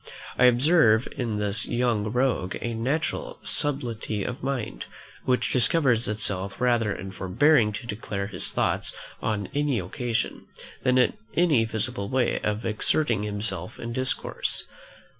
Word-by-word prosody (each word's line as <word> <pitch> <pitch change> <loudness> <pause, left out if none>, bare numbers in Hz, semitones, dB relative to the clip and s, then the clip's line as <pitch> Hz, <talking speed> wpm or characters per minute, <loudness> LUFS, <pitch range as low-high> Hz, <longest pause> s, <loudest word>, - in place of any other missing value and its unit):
I 125 - +4
observe 125 -2 +5
in 115 -5 -2
the 105 -1 -1 0.2
young 120 -3 +1
rogue 125 -7 0
a 120 - -3
natural 135 +8 -2
subtlety 120 -8 +1
of 125 +6 -5
mind, 125 - -3 0.4
which 125 -1 +1
discovers 125 - +3
itself 100 -2 -2
rather 120 -4 +2
in 95 0 -5
forbearing 105 - +3
to 105 - -6
declare 105 -3 -4
his 100 -4 -3
thoughts - - -1 0.3
on 105 -3 -1
any 145 -3 +1
occasion, 115 +5 -3 0.3
than 130 0 +3
in 125 -2 +4 0.2
any 155 -10 +4
visible 110 -1 -2
way 130 -2 +1
of 105 +1 -2
exerting 110 +1 +1
himself 105 -4 -3
in 115 0 -5
discourse. 130 +1 -1
115 Hz, 135 wpm, -26 LUFS, 105-130 Hz, 0.4 s, observe